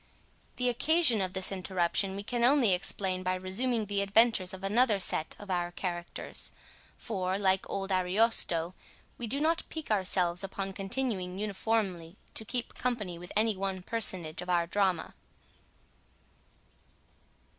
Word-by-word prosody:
The 250 - 0
occasion 250 - +3
of 185 -1 -2
this 190 0 +1
interruption 190 0 -1
we 200 - -5
can 240 +2 -1
only 250 -5 +5
explain 185 +1 -2
by 185 0 0
resuming 215 +5 -1
the 200 0 -1
adventures 200 -2 +3
of 190 -1 -8
another 215 +1 +3
set 160 -3 +2
of 205 -2 -8
our 175 -1 -1
characters; 175 -1 -4 0.5
for, 190 -3 -2
like 190 -1 +1
old 195 0 -3
Ariosto, 185 -2 +3 0.5
we 240 - -4
do 275 +6 +1
not 325 +2 +2
pique 315 -7 -6
ourselves 185 -3 +1
upon 195 0 -4
continuing 195 -3 -2
uniformly 200 -4 -2 0.2
to - - -1
keep 240 +2 -3
company 210 -9 -3
with 175 0 -10
any 215 0 +2
one 190 -1 -3
personage 180 -7 +1
of 180 - -8
our 175 -1 +2
drama. 185 -2 0
195 Hz, 140 wpm, -30 LUFS, 185-225 Hz, 0.5 s, only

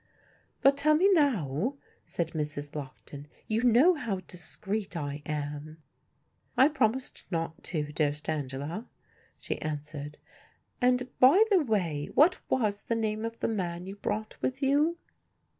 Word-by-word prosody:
"But 275 +1 +6
tell 305 +2 +4
me 385 +5 +5
now," 235 - +1 0.3
said 170 -2 -2
Mrs. 150 -2 -4
Lockton; 140 0 -8 0.2
"you 220 +1 +1
know 250 +9 +6
how 225 - -3
discreet 190 +2 -5
I 145 -1 -4
am." 150 +1 -4 0.8
"I 270 +3 +7
promised 260 -3 0
not 165 -2 -3
to, 150 -4 -2
dearest 150 -1 -1
Angela," 150 - -3 0.5
she - - -4
answered; 150 -1 -5 0.6
"and, 250 0 +3
by 285 +12 +8
the 390 - +6
way, 175 - -1
what 330 +6 +5
was 210 -5 +1
the 230 - -2
name 215 -1 -1
of 230 0 -4
the - - +1
man 180 -5 -2
you 195 +1 -7
brought 215 +1 -3
with 265 +2 -2
you?" 295 +5 +3
200 Hz, 140 wpm, -29 LUFS, 150-255 Hz, 0.8 s, by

